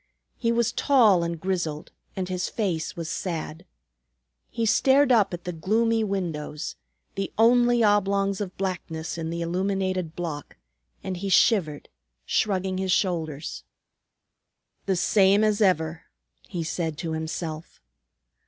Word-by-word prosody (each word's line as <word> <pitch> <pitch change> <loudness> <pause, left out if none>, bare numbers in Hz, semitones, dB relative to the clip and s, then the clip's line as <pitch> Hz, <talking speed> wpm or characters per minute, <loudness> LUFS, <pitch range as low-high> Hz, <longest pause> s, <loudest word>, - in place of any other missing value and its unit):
He 230 -2 +1
was 235 -1 +1
tall 225 - +4
and 170 -1 -3
grizzled 170 -4 -3 0.2
and 185 -1 -3
his 185 0 -2
face 180 -8 -2
was 165 -2 -5
sad. 165 0 -4 0.8
He 230 - -2
stared 265 +5 +4
up 220 -5 +4
at 175 -1 -6
the 180 - -4
gloomy 225 +7 +1
windows, 165 -7 -3 0.4
the 195 0 -3
only 240 +1 +4
oblongs 200 -1 +2
of 195 -2 -5
blackness 170 -5 -4
in 160 0 -3
the 170 +1 -3
illuminated 185 -1 -1
block, 160 -5 -5 0.5
and 185 -1 -4
he 195 +2 -3
shivered, 175 -7 +3 0.4
shrugging 190 -2 0
his 190 -1 -1
shoulders. 160 -6 -1 1.2
"The 190 - +2
same 195 +3 +4
as 215 0 +2
ever!" 165 -4 +1 0.4
he 170 -2 -4
said 160 -1 -3
to 165 0 -4
himself. 160 0 -5
185 Hz, 130 wpm, -25 LUFS, 165-205 Hz, 1.2 s, tall